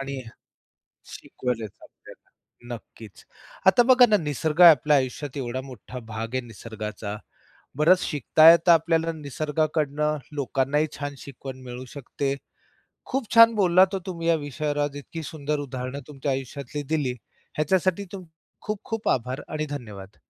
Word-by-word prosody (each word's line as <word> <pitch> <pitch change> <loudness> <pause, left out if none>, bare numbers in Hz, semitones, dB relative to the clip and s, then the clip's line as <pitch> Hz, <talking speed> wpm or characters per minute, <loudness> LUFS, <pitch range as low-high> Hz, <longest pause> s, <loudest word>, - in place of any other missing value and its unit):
आणि 135 -1 -5 0.8
शिकवले 125 -3 -5
जातात. 100 - -17 0.8
नक्कीच. 110 -2 -11 0.4
आता 190 +6 +7
बघा 255 -1 +8
ना 210 - +6
निसर्ग 155 0 -2
आपल्या 150 -3 +7
आयुष्यात 135 +2 -3
एवढा 130 -1 -3
मोठा 130 -1 -10
भाग 115 +2 -5
आहे 130 - +1
निसर्गाचा. 105 -1 -7 0.6
बरंच 170 +5 +5
शिकता 155 +2 +4
येत 170 +1 +4
आपल्याला 165 0 +4
निसर्गाकडनं. 150 0 -1 0.2
लोकांनाही 140 +1 0
छान 145 -1 -4
शिकवण 130 -1 -9
मिळू 125 +1 -7
शकते. 140 0 -3 0.7
खूप 265 -4 -3
छान 230 0 +8
बोललात 190 -1 +4
हो - - 0
तुम्ही 170 -2 -3
या 170 - +5
विषयावर 145 0 -2
इतकी 160 +3 -7
सुंदर 150 0 -3
उदाहरणं 130 0 -5
तुमच्या 140 -1 -3
आयुष्यातली 140 +2 -5
दिली 135 -5 0 0.4
ह्याच्यासाठी 185 +5 +1
तुम 190 -2 -7 0.4
खूप-खूप 215 +1 -4
आभार 125 +2 -1
आणि 155 0 -3
धन्यवाद. 105 -8 -8
145 Hz, 130 wpm, -25 LUFS, 130-165 Hz, 0.8 s, बघा